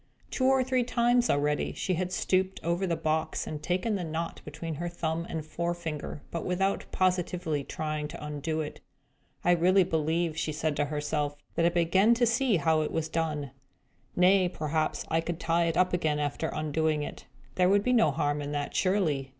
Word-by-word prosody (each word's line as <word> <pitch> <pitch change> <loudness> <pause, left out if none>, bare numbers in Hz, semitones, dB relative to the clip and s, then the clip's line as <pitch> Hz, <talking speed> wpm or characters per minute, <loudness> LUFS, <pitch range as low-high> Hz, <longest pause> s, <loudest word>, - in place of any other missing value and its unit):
Two 260 - 0
or 265 0 +4
three 255 -1 +1
times, 240 0 +2
already, 145 +1 +1
she 185 - -1
had 180 +1 -2
stooped 190 0 0
over 170 +3 0
the 170 - +1
box, 160 0 -1
and 150 -1 -5
taken 185 +7 0
the 195 -3 -1
knot 165 +1 -4
between 155 +2 -6
her 175 - -2
thumb 170 0 -3
and 160 -2 -4
forefinger, 165 -2 -4
but 170 - -3
without 195 +2 0
positively 180 -5 0
trying 155 0 -3
to 150 - -8
undo 150 +2 -2
it. 150 - -7 0.6
"I 175 - +4
really 185 +3 +5
believe," 160 -1 0
said 155 0 -1
she - - -9
to 145 - +2
herself, 150 0 -2 0.2
"that 170 - +3
I - - +5
begin 185 +6 +3
to 240 +1 +3
see 235 0 +2
how 160 0 +2
it 155 - -2
was 160 -1 -2
done. 155 -4 -2 0.6
Nay, 185 0 +5
perhaps 155 -2 -1
I 165 +1 +2
could 165 0 -4
tie 170 +1 +2
it 165 -1 0
up 185 0 +3
again, 155 -4 +1
after 145 +2 -1
undoing 155 0 0
it. - - -8 0.3
There 180 +3 +3
would 200 +1 +4
be 250 - +2
no 225 -9 +5
harm 145 +1 0
in 145 0 -4
that, 145 0 -3
surely. 165 -9 +1
165 Hz, 190 wpm, -29 LUFS, 155-185 Hz, 0.6 s, really